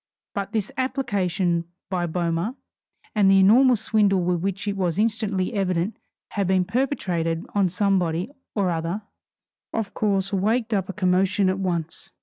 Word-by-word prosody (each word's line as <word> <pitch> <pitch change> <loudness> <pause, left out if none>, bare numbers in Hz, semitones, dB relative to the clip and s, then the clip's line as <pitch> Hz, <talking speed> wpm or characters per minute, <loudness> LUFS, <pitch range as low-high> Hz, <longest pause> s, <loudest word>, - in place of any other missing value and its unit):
But 200 -1 -3
this 215 -3 -1
application 190 -10 0 0.2
by 180 -2 -1
Boehmer, 170 +6 -1 0.6
and 205 -3 +4
the 195 - +6
enormous 235 +4 +5
swindle 205 -3 +3
which 180 +3 -1
it 200 - 0
was 180 -3 -1
instantly 210 -2 0
evident 185 0 0 0.3
had 200 -3 -1
been 185 -1 +2
perpetrated 180 - -1
on 200 -3 +2
somebody 185 +1 0 0.2
or 195 -4 +1
other, 170 +5 -2 0.7
of 225 -3 -3
course 195 -2 0
waked 220 +4 +1
up 195 -2 0
a - - -3
commotion 190 0 +2
at 190 +1 -1
once. 170 -4 -3
195 Hz, 140 wpm, -24 LUFS, 180-210 Hz, 0.7 s, the